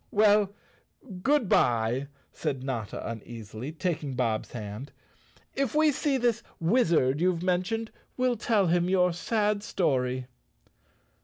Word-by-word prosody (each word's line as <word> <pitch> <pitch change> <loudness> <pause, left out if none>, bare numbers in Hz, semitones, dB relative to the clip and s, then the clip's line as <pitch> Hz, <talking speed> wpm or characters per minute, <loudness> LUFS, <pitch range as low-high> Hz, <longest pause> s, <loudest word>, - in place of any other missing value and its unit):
"Well, 210 -1 +4 0.7
good 280 -1 +2
bye!" 120 -1 +2 0.3
said 140 -5 -3
Notta 120 -6 -4
uneasily, 115 +2 -7
taking 160 -5 -2
Bob's 115 -4 -1
hand. 110 +4 -6 0.6
"If 275 -1 -1
we 310 0 +5
see 280 0 0
this 235 -2 +1 0.2
wizard 165 - +2
you've 180 -1 +1
mentioned 190 +5 0 0.3
we'll 255 -1 +2
tell 210 -2 +2
him 175 +1 +2
your 180 -2 +3
sad 210 +3 0
story." 130 -10 0
175 Hz, 120 wpm, -28 LUFS, 130-215 Hz, 0.7 s, we